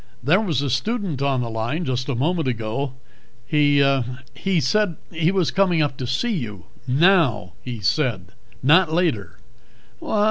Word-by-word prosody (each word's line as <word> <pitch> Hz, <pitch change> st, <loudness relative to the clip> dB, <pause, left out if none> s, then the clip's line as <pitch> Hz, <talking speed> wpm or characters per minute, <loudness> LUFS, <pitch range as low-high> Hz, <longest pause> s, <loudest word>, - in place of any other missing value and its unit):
There 170 Hz, -, +3 dB
was 160 Hz, -, -1 dB
a 140 Hz, -, -1 dB
student 190 Hz, -, -2 dB
on 135 Hz, -2 st, +1 dB
the 120 Hz, -, -3 dB
line 120 Hz, +10 st, -2 dB
just 130 Hz, 0 st, -2 dB
a 135 Hz, -, 0 dB
moment 160 Hz, +4 st, 0 dB
ago. 120 Hz, +3 st, -2 dB, 0.5 s
He 145 Hz, 0 st, +3 dB, 0.5 s
he 190 Hz, -3 st, 0 dB
said 180 Hz, +5 st, +1 dB, 0.2 s
he 165 Hz, +1 st, +1 dB
was 185 Hz, -4 st, +1 dB
coming 180 Hz, -5 st, +2 dB
up 145 Hz, -2 st, -2 dB
to 125 Hz, -, -4 dB
see 225 Hz, -, 0 dB
you. 105 Hz, -, -5 dB, 0.2 s
Now, 135 Hz, -, +3 dB
he 120 Hz, -4 st, -6 dB
said, 110 Hz, -, 0 dB, 0.3 s
not 165 Hz, +5 st, +5 dB
later." 115 Hz, -, -1 dB
140 Hz, 150 wpm, -22 LUFS, 120-175 Hz, 0.5 s, not